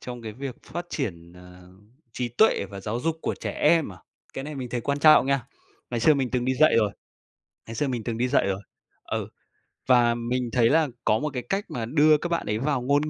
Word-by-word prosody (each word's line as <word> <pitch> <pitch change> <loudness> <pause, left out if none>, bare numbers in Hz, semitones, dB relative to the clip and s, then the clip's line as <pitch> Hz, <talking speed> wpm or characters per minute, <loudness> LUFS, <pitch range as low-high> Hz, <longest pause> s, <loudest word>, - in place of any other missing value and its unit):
trong 120 -1 -8
cái 110 -1 -6
việc 130 +2 -7
phát 175 0 -6
triển, 85 - -4
à, 90 0 -15 0.5
trí 125 0 -3
tuệ 120 - +3
và 100 -1 -8
giáo 110 +4 -3
dục 165 +3 -1
của - - -1
trẻ - - -3
em 165 -10 +2
à? 90 - -14 0.4
Cái 135 - -5
này 150 +1 -6
mình 130 -3 -5
thấy 120 0 -3
quan 140 +4 -1
trọng 155 -2 +6
nha. 135 -3 0 0.4
Ngày 120 -1 -2
xưa 155 +6 +5
mình 135 -3 -1
từng 125 -1 -1
đi 130 +1 +1
dạy 155 0 +4
rồi, 105 -3 +2 0.8
ngày 115 - -7
xưa 145 +5 0
mình 120 -4 -3
từng 115 -2 -3
đi 125 +2 +1
dạy 125 -5 +2
rồi. 95 0 -2 0.4
Ừ. - - -3 0.6
Và 120 -2 +4
mình 120 +1 -2
thấy 120 -2 +3
là 160 0 +3 0.2
có 110 - +3
một 150 - -2
cái 125 -2 -3
cách 195 - -2
mà 115 -2 -3
đưa 150 +4 +4
các 175 - -4
bạn 170 - -1
ấy 105 +1 0
vào 140 0 0
ngôn 145 +4 +1
125 Hz, 240 wpm, -25 LUFS, 115-145 Hz, 0.8 s, trọng